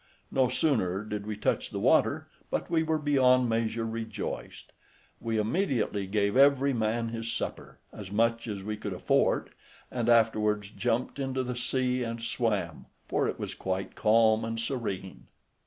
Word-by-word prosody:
No 130 -2 +3
sooner 110 - +1
did 105 -1 -5
we 105 -1 -3
touch - - 0
the - - -5
water, - - +3 0.2
but - - -3
we 165 - +3
were 160 0 +1
beyond 130 -4 +4
measure 115 0 0
rejoiced. 110 -2 -5 0.5
We 115 -1 -2
immediately 110 - 0
gave 100 0 +1
every 140 0 +5
man 115 0 0
his 115 0 -4
supper, - - -5 0.2
as 100 -3 -9
much 115 +2 +1
as 100 -3 -4
we 105 +1 -3
could - - -4
afford, - - +1 0.4
and 120 -2 -1
afterwards 105 -3 +3
jumped 120 +4 -1
into 130 -1 -1
the 125 0 -4
sea 125 0 0
and 115 -1 -3
swam, 105 - -2 0.2
for - - +1
it - - -3
was - - -4
quite 95 0 -3
calm 110 0 +4
and 115 0 -3
serene. 115 -6 -4
115 Hz, 155 wpm, -29 LUFS, 105-125 Hz, 0.5 s, every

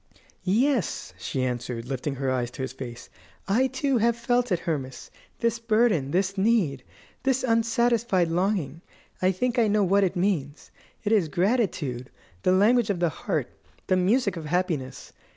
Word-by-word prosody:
"Yes," 240 +4 0
she 130 - -2
answered, 120 -2 -3
lifting 135 +2 -3
her 135 0 -1
eyes 125 -2 -1
to 130 +2 -6
his 130 - -4
face; 120 -2 -8 0.4
"I, 235 +7 +3
too, 265 0 0
have 235 +1 +2
felt 245 0 0
it, 180 - +1
Hermas, 135 -6 -4 0.3
this 230 0 +1
burden, 220 - +2
this 190 +4 0
need, 190 - +2 0.4
this 265 -1 +1
unsatisfied 230 -5 +2
longing. 170 -4 -1 0.4
I 185 +1 +4
think 245 +6 -1
I 225 - +4
know 210 0 +2
what 195 +2 +3
it 185 - 0
means. 175 -6 -2 0.3
It 210 - -1
is 205 -7 +3
gratitude 170 - -1 0.3
the - - +2
language 210 +4 +4
of 195 -4 0
the 175 -1 +2
heart, 145 - -3 0.3
the 185 - +2
music 200 +2 +2
of 160 - -6
happiness. 155 -6 -2
185 Hz, 160 wpm, -26 LUFS, 145-230 Hz, 0.4 s, I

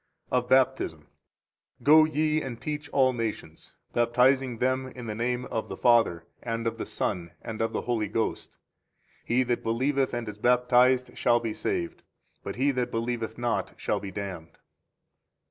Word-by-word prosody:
21 125 -1 +2
OF 125 - -18
BAPTISM. 130 0 +2 0.8
Go 155 +1 +7
ye 155 0 +1
and 120 -4 -6
teach 150 0 -5
all 130 -3 +3
nations, 110 -9 -5 0.2
baptizing 125 +1 +3
them 130 +2 0
in 125 -1 -9
the 110 - -3
name 125 +3 -1
of 110 - -4
the - - -6
Father, 115 -9 +3 0.2
and 115 -1 -3
of 115 - -2
the - - -4
Son, 85 -2 -2
and 110 -1 -5
of 115 0 0
the - - -2
Holy 115 -3 -1
Ghost. 110 +2 -3 0.7
He 125 +2 +2
that 120 -1 -1
believeth 130 +3 0
and 120 -2 -4
is 105 0 -7
baptized 125 +1 +3
shall 120 - +3
be 115 -2 -3
saved; 85 -4 -3 0.4
but - - -5
he 140 +3 +2
that 125 -2 -1
believeth 115 -1 -3
not 120 -1 -2
shall 105 - -1
be 100 -1 -6
damned. 95 -4 -7
120 Hz, 165 wpm, -27 LUFS, 115-130 Hz, 0.8 s, Go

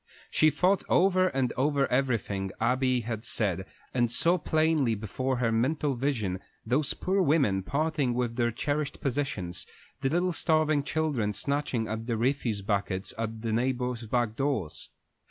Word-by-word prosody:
She 155 - +5
thought 180 +6 +2
over 185 0 +4
and 130 -7 0
over 140 +1 +2
everything 115 -7 0
Abby 130 +1 +2
had 110 -1 -4
said, 95 -5 -1 0.3
and 120 -2 +2
saw 170 +8 +3
plainly 155 -6 +2
before 130 +5 -2
her 120 -2 +1
mental 140 +5 +1
vision 120 -8 -1 0.3
those 140 +3 +1
poor 190 +1 +1
women 140 - +3
parting 140 +1 0
with 120 -2 -1
their 120 -1 +2
cherished 145 +5 -2
possessions, 120 -11 -3 0.3
the 135 -1 0
little 175 +4 +1
starving 155 -3 +2
children 140 -8 -1
snatching 140 -2 -1
at 110 +1 -4
the 115 -2 0
refuse 120 -4 0
buckets 100 -2 -1
at 110 0 -4
the 115 -1 -1
neighbors' 125 -1 -1
back 120 -1 0
doors. 135 - -1
125 Hz, 150 wpm, -28 LUFS, 115-145 Hz, 0.3 s, She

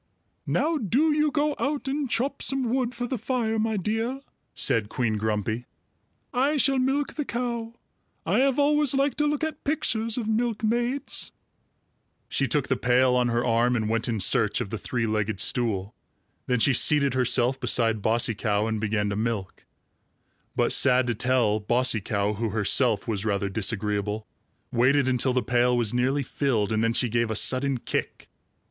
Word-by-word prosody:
"Now 320 0 +1
do 280 - +2
you 300 0 +2
go 295 0 0
out 285 -1 -2
and 275 0 -2
chop 275 +4 -1
some 260 -3 -1
wood 250 -2 -1
for 245 +1 -3
the 245 -1 -3
fire, 225 -1 -1
my 220 0 0
dear," 225 +7 -2 0.3
said 105 -2 +1
Queen 115 -3 -1
Grumpy. 110 +2 -2 0.7
"I 275 +4 +1
shall 275 -1 +2
milk 270 +3 0
the 300 - -3
cow. 235 -1 -4 0.5
I - - +2
have 270 -1 +2
always 295 -1 +3
liked 275 +2 0
to 295 - +2
look 295 +1 -1
at 315 -1 -4
pictures 230 -6 -1
of 230 -3 -2
milkmaids." 235 +4 -1 1.0
She 135 - 0
took 140 +3 0
the - - 0
pail 125 +1 +3
on 125 -1 +2
her 120 0 0
arm 120 +1 +2
and 110 -3 -1
went 115 +1 -1
in 110 -2 -1
search 95 - +2
of 100 - -4
the 110 - -4
three 120 -2 -2
legged 110 -2 -1
stool. 110 -5 -1 0.5
Then 125 - +2
she 135 +4 +4
seated 140 -1 +3
herself 130 0 +1
beside 115 -3 0
Bossy 115 +2 +1
Cow 105 0 0
and 110 -1 -2
began 105 -1 0
to - - -2
milk. 110 -3 -4 0.9
But - - +2
sad 130 -2 +4
to 120 - 0
tell, 115 -2 +1
Bossy 120 +1 +1
Cow, 100 +1 -1
who 110 +2 -2
herself 110 +1 +1
was 105 -3 -2
rather 100 -2 -1
disagreeable, 105 +1 -1 0.5
waited 130 +3 +3
until 130 0 +1
the 125 -1 +1
pail 125 +2 +2
was 115 -2 0
nearly 130 +3 +1
filled, 120 -7 -1
and 110 0 +1
then 115 0 +1
she 125 +1 +2
gave 115 0 0
a 110 - -2
sudden 130 +4 +1
kick. - - -4
125 Hz, 175 wpm, -25 LUFS, -, 1.0 s, she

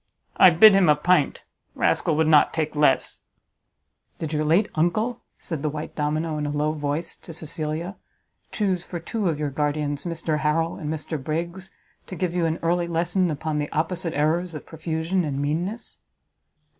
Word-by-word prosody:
I 185 - +8
bid 195 +5 +8
him 195 -4 +4
a 150 - +6
pint; 150 -1 +2 0.3
rascal 155 - +1
would 160 +1 +2
not 155 -2 +5
take 155 -1 -1
less." 145 -3 +2 1.0
"Did 160 -1 -4
your 155 0 +1
late 170 +8 +3
uncle," 215 +9 0 0.2
said 160 -5 -5
the 155 - 0
white 150 +1 -6
domino 155 +1 -1
in 150 - -2
a - - -2
low 150 +1 0
voice 150 +2 -3
to - - -10
Cecilia, 160 +3 -4 0.5
"chuse 190 -4 0
for 175 -1 -6
two 200 +3 -2
of 155 - -1
your 150 -1 -2
guardians 145 +1 -1
Mr 165 -2 -2
Harrel 165 +2 0
and 150 -1 -4
Mr 155 -2 -4
Briggs, 170 +5 -3 0.4
to 185 - -7
give 180 -1 -2
you 175 -2 +1
an 160 +1 -1
early 170 +1 +1
lesson 175 +2 +1
upon 155 0 -2
the 145 - -3
opposite 165 +2 -2
errors 160 +4 0
of 150 - -7
profusion 160 +3 -2
and 140 -3 -2
meanness?" 175 +11 -3
160 Hz, 175 wpm, -24 LUFS, 150-175 Hz, 1.0 s, I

